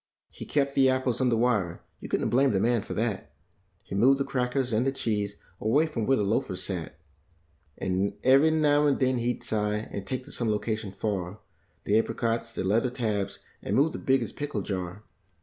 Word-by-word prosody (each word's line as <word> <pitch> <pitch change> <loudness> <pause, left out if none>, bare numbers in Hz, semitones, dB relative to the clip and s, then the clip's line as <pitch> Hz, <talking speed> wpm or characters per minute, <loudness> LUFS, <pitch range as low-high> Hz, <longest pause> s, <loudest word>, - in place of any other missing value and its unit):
He - - -9
kept 140 -1 0
the 135 -1 +4
apples 130 -1 0
under 125 -2 +3
wire; 105 -8 0 0.2
you - - -8
couldn't - - 0
blame 135 0 +3
the 95 - +2
man 120 +1 +2
for - - -6
that; 110 -3 -2 0.5
He - - -9
moved 125 +8 +5
the 140 - -1
crackers 125 -1 -1
and 110 +3 +2
the 135 - +1
cheese 105 -6 -2 0.2
away 140 +9 +3
from 125 -9 -3
where 135 - +4
the 105 - +1
ioafers 100 -3 0
sat. 90 -3 -4 0.8
And 95 +2 -1
every 135 +4 +6
now 150 -2 +3
and 140 - +2
then 130 -2 +1
he'd 120 +1 -2
sigh 105 0 -1
and 100 -1 -6
take 130 -1 -3
to - - -12
some 120 -2 -1
location 105 -1 -2
far 100 -2 -3 0.5
The 105 +2 +3
apricots, 115 0 -2
like - - -1
leather 115 +6 +2
tabs, 105 -6 -2 0.2
and - - -2
move 150 +4 +3
the - - -5
biggest 135 0 +1
pickle 145 -9 -3
jar. 95 +1 -4
115 Hz, 195 wpm, -27 LUFS, 105-130 Hz, 0.8 s, every